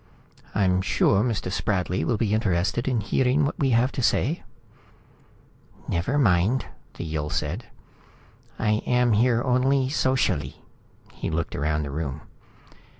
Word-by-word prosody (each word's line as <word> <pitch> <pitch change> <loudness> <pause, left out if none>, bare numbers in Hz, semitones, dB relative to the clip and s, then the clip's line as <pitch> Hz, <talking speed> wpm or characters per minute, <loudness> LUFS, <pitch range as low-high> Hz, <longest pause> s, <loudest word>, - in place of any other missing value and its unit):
"I'm 95 -2 +2
sure 95 +1 +2
Mr. 110 -6 -1
Spradley 95 -5 -1
will 95 +7 0
be 105 -1 0
interested 100 +2 0
in 125 -4 +1
hearing 130 +7 +2
what 145 - -3
we 135 - +2
have 120 +2 +3
to - - -3
say." 145 +6 +1 1.5
"Never 90 +12 -1
mind," 105 0 +2 0.3
the - - -5
Yill 75 -2 -3
said. - - -3 0.9
"I 105 0 +1
am 125 -1 +3
here 120 +2 +3
only 130 +1 +2
socially." 130 -2 0 0.5
He - - -4
looked 85 +1 -2
around 75 +1 0
the 70 - -5
room. 75 -1 -4
110 Hz, 135 wpm, -25 LUFS, 85-125 Hz, 1.5 s, have